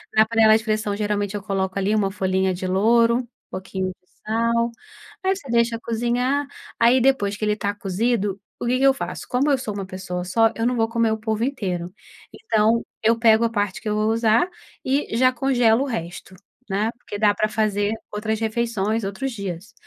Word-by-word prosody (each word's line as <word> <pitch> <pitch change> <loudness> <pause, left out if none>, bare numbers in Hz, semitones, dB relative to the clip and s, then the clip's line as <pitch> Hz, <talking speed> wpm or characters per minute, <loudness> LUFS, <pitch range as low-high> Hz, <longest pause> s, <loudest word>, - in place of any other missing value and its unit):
na 220 0 +6
panela 220 -1 +5
de 220 - -7
pressão 215 -2 -1
geralmente 205 -1 -1
eu 200 - -5
coloco 190 -1 -2
ali 195 +2 +1
uma 200 -2 +2
folhinha 190 -1 0
de 185 +1 -5
louro, 230 +5 +3 0.2
pouquinho 185 0 -4
de 185 - -40 0.2
sal, 230 +1 +1 0.5
aí 385 0 +3
você 280 -9 -11
deixa 235 0 +2
cozinhar, 240 +5 -1 0.3
aí 240 +2 +5
depois 210 -7 +2
que 215 - -7
ele 210 - +2
está 205 -1 -2
cozido, 205 0 -1 0.2
o - - -2
que 250 +1 +2
que - - 0
eu 270 - +6
faço? 270 - -6
Como 270 +4 +1
eu 275 - +3
sou 225 -5 -5
uma 200 -1 -4
pessoa 185 -1 -5
só, 225 +5 +2
eu 225 - -1
não 250 0 +1
vou 225 -1 +2
comer 230 -1 +1
o 220 - 0
polvo 220 0 -2
inteiro. 185 -9 -3 0.4
Então, 230 - +1 0.2
eu 230 +1 +4
pego 225 0 +5
a 230 - +1
parte 205 -3 -2
que 225 - -7
eu 210 - 0
vou 215 +1 +1
usar, 230 +8 +3 0.4
e 265 -4 0
já 255 0 +5
congelo 245 -2 +2
o - - -2
resto, 185 -5 -6 0.3
né, 205 +4 0
porque 205 - -7
dá 205 0 +4
para 215 +1 0
fazer 210 -1 0 0.2
outras 215 +1 -2
refeições, 225 -1 -1
outros 200 +8 -3
dias.. 200 0 -6
220 Hz, 200 wpm, -22 LUFS, 200-235 Hz, 0.5 s, na